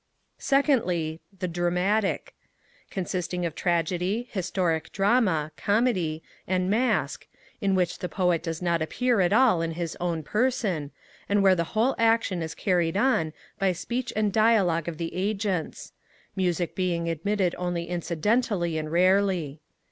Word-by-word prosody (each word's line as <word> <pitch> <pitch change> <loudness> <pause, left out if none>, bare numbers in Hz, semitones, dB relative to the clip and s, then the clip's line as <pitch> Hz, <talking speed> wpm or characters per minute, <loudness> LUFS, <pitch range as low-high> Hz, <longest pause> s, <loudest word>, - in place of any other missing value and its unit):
2ndly, 185 - +1 0.2
The 185 0 -2
Dramatic, 180 +4 0 0.6
consisting 180 -1 -3
of 165 - -2
Tragedy, 180 +7 -1
Historic 180 -4 -1
Drama, 195 -7 +2
Comedy, 200 -8 0 0.2
and 185 +1 0
Masque, 245 +4 0 0.3
in 195 -2 +2
which 180 -2 0
the 180 - -4
Poet 180 -4 +1
does 165 0 -4
not 170 -2 +1
appear 245 +8 +1
at 175 0 +2
all 225 -6 +4
in 165 0 -2
his 170 -1 -4
own 170 -3 -2
person, 210 - 0 0.4
and 200 0 +3
where 190 -1 +6
the 170 -2 +1
whole 240 +5 +3
action 225 -5 +2
is 160 0 -5
carried 175 -3 +1
on 205 -9 +2 0.3
by 195 -2 +2
speech 240 +8 -3
and 210 -2 +1
dialogue 200 -8 +3
of 165 -2 -4
the 165 0 -4
agents; 195 -2 -2 0.4
music 180 -2 0
being 175 -3 -1
admitted 180 +3 0
only 175 -1 -2
incidentally 175 +1 0
and 155 0 -5
rarely. 180 -4 +2
180 Hz, 140 wpm, -26 LUFS, 170-205 Hz, 0.6 s, where